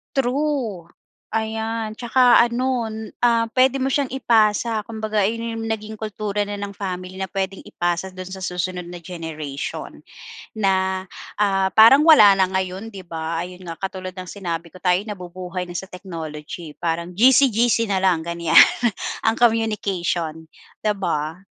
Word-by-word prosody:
True! 255 - -1 0.4
Ayan.Tsaka 225 +2 +2
ano, 240 0 +1 0.3
ah, 230 -1 +2
puwede 260 +1 +3
mo 270 - 0
siyang 280 0 +1
ipasa 225 -2 +2
kumbaga 215 -1 -2
ayun 230 +1 -3
'yung 225 - -4
naging 220 -1 -4
kultura 210 -1 -3
na 205 - -4
ng 200 0 -5
family 185 -1 -6
na 190 - -2
puwedeng 190 0 -3
ipasa 175 +1 -1
do'n 185 0 -8
sa 190 - -7
susunod 180 -1 -3
na 175 -1 -9
generation. 160 -5 -6 0.5
Na 190 -2 0 0.3
ah, 195 -2 +2
parang 230 +7 +7
wala 215 -12 +8
na 190 - +3
ngayon 190 +3 -3
di 190 -3 -10
ba? 165 0 -3
Ayun 180 +1 -7
nga, 165 - -9
katulad 185 -1 -5
ng 185 - -7
sinabi 170 -3 -5
ko, 180 +2 -16
tayo 180 0 +3
nabubuhay 180 -2 -6
na 175 - -9
sa 190 - -9
technology, 165 -3 -8
parang 170 +1 -3
GC, 260 +6 +6
GC 230 -1 +2
na 190 -2 0
lang 185 -3 +3
ganiyan, 170 0 +3 0.6
ang 225 0 +1
communication, 195 -8 0 0.4
di 215 - +2
ba? 165 -5 -2
195 Hz, 150 wpm, -22 LUFS, 180-225 Hz, 0.6 s, wala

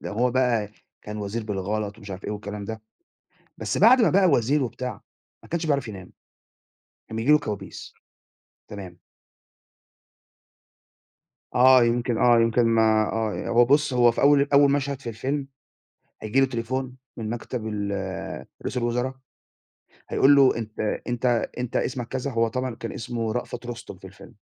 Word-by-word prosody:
ده - - -6
هو 120 +4 +1
بقى 120 -5 +1 0.3
كان 105 0 -7
وزير 105 +2 -4
بالغلط 105 0 -3
ومش 100 0 -11
عارف 95 0 -7
إيه - - -3
والكلام 105 0 -6
ده، 110 +1 -6 0.7
بس - - -2
بعد 240 +5 +7
ما 185 - +4
بقى 190 0 +4
وزير 140 -1 +2
وبتاع، 125 0 -5 0.4
ما - - -16
كانش 170 -1 -2
بيعرف 140 -5 0
ينام، 95 -4 -9 1.0
كان 110 - -8
بييجي 120 +6 +2
له 150 - +7
كوابيس. 105 -7 -7 0.8
تمام. 95 -4 -9 2.6
آه. 130 0 +7
يمكن 120 0 0
آه. 120 -1 +5
يمكن 115 +1 +3
ما 110 -1 +3
آه. 110 -2 -2
هو 120 +1 +5
بُص، 145 +3 +2
هو 120 -1 +5
في - - -3
أول 140 0 +4
أول 140 0 +6
مشهد 140 -1 -1
في 125 - -7
الفيلم، 135 +5 -3 0.8
هييجي 110 +5 +1
له 135 - +4
تليفون 130 +1 -4 0.2
من 110 -2 -4
مكتب 120 0 -5
ال 100 -3 -4 0.2
رئيس - - -4
الوُزَرا، 125 +2 -1 1.0
هيقول 140 +2 +5
له: 135 -3 +5
"أنت 110 -2 -7 0.3
أنت 120 0 -2 0.3
أنت 125 -1 -4
اسمك،" 125 -2 -2
كذا، 130 +2 -3
هو 115 -1 +1
طبعًا 125 +1 -3
كان 115 - -6
اسمه 115 -2 -3
رأفَت 120 +1 -5
رُستُم 120 -4 -8
في 95 - -12
الفيلم. 95 0 -15
120 Hz, 155 wpm, -24 LUFS, 110-130 Hz, 2.6 s, بعد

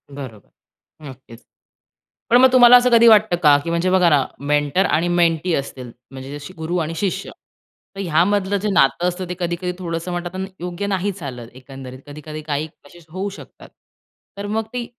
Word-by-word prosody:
बरोबर 115 - -10 0.6
नक्कीच. 125 -3 -14 0.9
पण 240 - +6
मग 260 0 +6
तुम्हाला 250 -1 +8
असं 250 0 +2
कधी 235 0 +6
वाटतं 215 -4 +5
का 145 -2 +6
की 170 - -5
म्हणजे 170 +2 0
बघा 185 -2 +4
ना 145 -4 +3
मेंटर 145 +5 +1
आणि 165 0 +1
मेंटी 175 0 +1
असतील 130 -3 -6 0.2
म्हणजे 135 +2 -8
जशी 145 +5 -11
गुरु 160 +3 -3
आणि 165 +2 -5
शिष्य 190 +2 -3 0.6
तर - - -9
ह्यामधलं 190 +3 +1
जे 210 +2 -2
नातं 170 +3 +2
असतं 180 +1 -3
ते - - -2
कधी-कधी 175 +1 -3
थोडंसं 170 0 -4
म्हणतात 175 +1 -5 0.2
योग्य 180 +3 -5
नाही 195 0 -1
चालत 135 -11 -8
एकंदरीत, 130 0 -11
कधी-कधी 150 +1 -9
काही 150 0 -3 0.2
असे 175 +4 -16
होऊ 190 +5 -4
शकतात. 200 - -14 0.7
तर 200 - -5
मग 220 +1 -2
ते 245 -1 -3
170 Hz, 170 wpm, -20 LUFS, 145-190 Hz, 0.9 s, तुम्हाला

